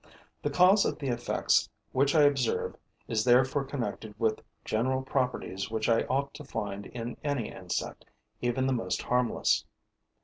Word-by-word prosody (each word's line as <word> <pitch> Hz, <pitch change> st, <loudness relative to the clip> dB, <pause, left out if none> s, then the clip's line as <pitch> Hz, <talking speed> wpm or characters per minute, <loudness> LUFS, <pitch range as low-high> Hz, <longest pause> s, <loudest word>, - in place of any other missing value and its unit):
The -, -, 0 dB
cause 190 Hz, +3 st, +5 dB
of -, -, -1 dB
the 140 Hz, -, -3 dB
effects 120 Hz, 0 st, +1 dB, 0.2 s
which 140 Hz, +3 st, +2 dB
I 150 Hz, -, +7 dB
observe 135 Hz, -5 st, +1 dB, 0.3 s
is 110 Hz, -1 st, 0 dB
therefore 130 Hz, +3 st, +4 dB
connected 115 Hz, -6 st, -5 dB
with 110 Hz, -1 st, +1 dB, 0.2 s
general 130 Hz, +4 st, 0 dB
properties 125 Hz, -7 st, -2 dB
which 110 Hz, -1 st, -1 dB
I 115 Hz, -1 st, +3 dB
ought 140 Hz, +2 st, -1 dB
to 150 Hz, -, -9 dB
find 100 Hz, -7 st, -4 dB
in 120 Hz, 0 st, -6 dB
any 145 Hz, -6 st, -1 dB
insect, 90 Hz, -1 st, -4 dB, 0.4 s
even 120 Hz, +2 st, 0 dB
the 135 Hz, -, +2 dB
most 95 Hz, -7 st, -2 dB
harmless. 125 Hz, -1 st, +2 dB
125 Hz, 150 wpm, -29 LUFS, 110-135 Hz, 0.4 s, I